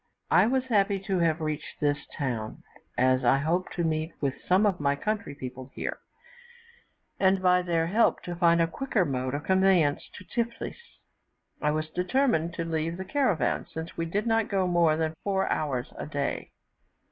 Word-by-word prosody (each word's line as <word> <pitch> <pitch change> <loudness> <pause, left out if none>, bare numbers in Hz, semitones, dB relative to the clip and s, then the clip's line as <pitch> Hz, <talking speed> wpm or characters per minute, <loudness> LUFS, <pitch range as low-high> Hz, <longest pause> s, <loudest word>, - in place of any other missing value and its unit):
I - - +6
was 260 +1 +1
happy 205 -5 +2
to 195 -2 -1
have 165 -1 +2
reached 155 -1 -4
this 145 -1 0
town, 120 -7 -3 0.3
as 130 +1 +3
I 125 +2 +5
hoped 165 +6 -1
to 175 - -1
meet 160 0 -1
with 140 -2 0
some 190 +4 +4
of 195 -4 +1
my 140 -1 +1
country 205 -3 -3
people 130 -1 -8
here, - - -4 1.2
and, 190 0 +4
by 180 -1 +4
their 170 -2 0
help, 210 +7 +2
to 175 - -5
find 170 -1 +4
a - - +4
quicker 215 +1 0
mode 130 -2 -2
of 145 - -4
conveyance 190 -4 +3
to 185 - -11
Tiflis. 235 +4 -3 0.8
I 150 - +2
was 155 +1 -1
determined 180 - +1
to 165 - -3
leave 165 +1 -2
the 190 - -5
caravan, 205 - 0
since 160 +1 -6
we 165 0 -2
did 205 +6 -1
not 225 -1 +1
go 195 -2 +1
more 170 -3 +3
than 160 -1 -1
four 195 -1 0
hours 135 -5 -2
a - - -6
day. 145 -2 -3
170 Hz, 180 wpm, -27 LUFS, 150-190 Hz, 1.2 s, I